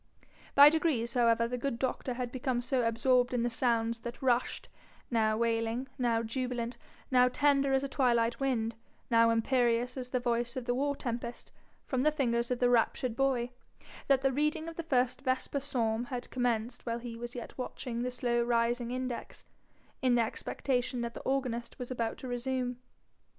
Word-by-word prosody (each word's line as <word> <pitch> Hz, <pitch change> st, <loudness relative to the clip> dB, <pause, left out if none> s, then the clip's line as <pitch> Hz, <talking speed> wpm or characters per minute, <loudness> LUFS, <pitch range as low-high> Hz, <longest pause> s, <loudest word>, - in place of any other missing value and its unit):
By 285 Hz, +1 st, +10 dB
degrees 295 Hz, -7 st, 0 dB
however 230 Hz, -1 st, +3 dB
the 250 Hz, +1 st, -3 dB
good 260 Hz, -2 st, -2 dB
doctor 255 Hz, 0 st, -2 dB
had 245 Hz, -1 st, -3 dB
become 250 Hz, -1 st, -1 dB
so 255 Hz, +1 st, +1 dB
absorbed 245 Hz, +2 st, +2 dB
in 235 Hz, -, +1 dB
the 240 Hz, -, 0 dB
sounds 230 Hz, -1 st, +1 dB
that 235 Hz, +1 st, -7 dB
rushed, 250 Hz, -2 st, 0 dB, 0.4 s
now 215 Hz, -2 st, +2 dB
wailing, 230 Hz, +2 st, 0 dB
now 230 Hz, -2 st, +1 dB
jubilant, 245 Hz, 0 st, -3 dB, 0.4 s
now 250 Hz, -1 st, +6 dB
tender 275 Hz, +1 st, +2 dB
as 270 Hz, 0 st, +2 dB
a -, -, -1 dB
twilight 240 Hz, -4 st, +2 dB
wind, 235 Hz, -5 st, 0 dB, 0.4 s
now 230 Hz, 0 st, +6 dB
imperious 240 Hz, +1 st, +1 dB
as 250 Hz, -1 st, -5 dB
the 250 Hz, -, 0 dB
voice 240 Hz, +1 st, -1 dB
of 255 Hz, -, -4 dB
the 245 Hz, -, +1 dB
war 285 Hz, +3 st, 0 dB
tempest, 240 Hz, -2 st, -5 dB, 0.3 s
from 260 Hz, -2 st, -1 dB
the 305 Hz, +3 st, +4 dB
fingers 235 Hz, -5 st, 0 dB
of 250 Hz, -, 0 dB
the 245 Hz, -, +3 dB
raptured 240 Hz, 0 st, +2 dB
boy, 250 Hz, -2 st, +1 dB, 0.6 s
that 275 Hz, -1 st, +4 dB
the 270 Hz, -, +3 dB
reading 300 Hz, +3 st, 0 dB
of 330 Hz, -, -6 dB
the 335 Hz, -, -3 dB
first 255 Hz, -5 st, +1 dB
vesper 260 Hz, +1 st, -1 dB
psalm 240 Hz, -4 st, -1 dB
had 245 Hz, -1 st, -6 dB
commenced 245 Hz, -1 st, -1 dB
while 230 Hz, -1 st, -2 dB
he 235 Hz, -1 st, -7 dB
was 240 Hz, +1 st, -7 dB
yet 240 Hz, -, -7 dB
watching 250 Hz, -2 st, -4 dB
the 250 Hz, -, -1 dB
slow 240 Hz, -1 st, 0 dB
rising 235 Hz, 0 st, +1 dB
index, 255 Hz, -1 st, -5 dB, 0.6 s
in 255 Hz, -2 st, +3 dB
the 235 Hz, -, +4 dB
expectation 245 Hz, +2 st, -2 dB
that 235 Hz, 0 st, -3 dB
the -, -, -7 dB
organist 255 Hz, -3 st, -2 dB
was 250 Hz, 0 st, -6 dB
about 230 Hz, -3 st, -2 dB
to 260 Hz, -, -8 dB
resume. 250 Hz, 0 st, -2 dB
245 Hz, 180 wpm, -31 LUFS, 235-260 Hz, 0.6 s, By